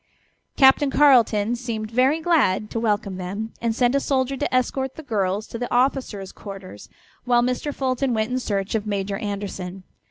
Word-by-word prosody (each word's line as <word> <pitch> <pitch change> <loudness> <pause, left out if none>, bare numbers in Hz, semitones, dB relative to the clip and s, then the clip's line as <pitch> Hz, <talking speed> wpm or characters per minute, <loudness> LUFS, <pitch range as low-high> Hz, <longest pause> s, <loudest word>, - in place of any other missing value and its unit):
Captain 270 +1 +6
Carleton 240 -6 +4
seemed 230 -3 -5
very 260 +6 +3
glad 260 - +2
to 230 - -2
welcome 205 -4 -1
them, 200 +5 -5
and 230 -1 0
sent 245 +1 +2
a 280 - +3
soldier 270 -1 0
to - - -2
escort 260 +1 0
the 315 - -9
girls 205 -4 -1
to 230 - -7
the 245 - -4
officers' 245 -6 0
quarters, 195 - -10 0.3
while 240 -1 +3
Mr. 250 +4 -1
Fulton 265 -1 -1
went 220 0 -1
in 255 - 0
search 200 -5 -2
of 215 -1 -1
Major 200 -1 -2
Anderson. 195 -3 -5
230 Hz, 170 wpm, -23 LUFS, 205-260 Hz, 0.3 s, Captain